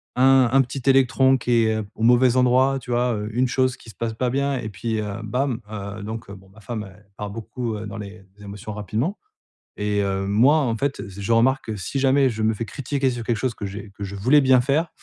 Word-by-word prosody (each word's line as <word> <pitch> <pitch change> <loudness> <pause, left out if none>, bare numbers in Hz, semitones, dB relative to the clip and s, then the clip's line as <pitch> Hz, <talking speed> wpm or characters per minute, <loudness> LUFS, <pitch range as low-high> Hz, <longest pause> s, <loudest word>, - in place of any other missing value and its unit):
un 130 -1 +5
un 135 +1 +5
petit 130 +2 -6
électron 130 0 +4
qui 120 0 -3
est 110 0 +1 0.2
au - - -10
mauvais 125 +1 +5
endroit, 130 +2 +3
tu 125 - -13
vois? 120 0 +1
Heu, 105 0 -4
une 125 +2 +2
chose 130 0 0
qui 115 - -15
se - - -25
passe 115 -1 -3
pas 125 +2 0
bien 140 +1 0
et 115 -3 -5
puis, 110 +3 -3
heu, 105 -1 -4
bam, 125 +2 -1
heu, 100 0 -6
donc 110 0 -6
heu, - - -8
bon 95 0 -17
ma 110 +3 -18
femme 105 -2 -6
elle 105 -1 -22
part 105 -1 -5
beaucoup, 115 +2 -5
heu, 105 - -6
dans 100 - -7
les 100 -1 -9
émotions 105 +1 -8
rapidement. 110 - -2 0.6
Et 105 0 0
heu, 95 0 -1
moi 120 +10 +4
en 125 -7 +1
fait 140 +3 -2
z 100 +1 -9
je 100 +4 -2
remarque 130 +4 +3
que 110 - -3
si 135 +8 -3
jamais 135 0 +4
je 110 -2 -3
me 110 +1 +2
fais 115 +2 -4
critiquer 140 +1 -2
sur 120 -2 -4
quelque 115 0 -1
chose 125 0 -2
que 105 - -6
j'ai 100 +1 -7
que 105 - -6
je 100 0 -5
voulais 130 +9 +4
bien 130 -1 +5
faire, 145 +6 +1
115 Hz, 250 wpm, -23 LUFS, 105-130 Hz, 0.6 s, un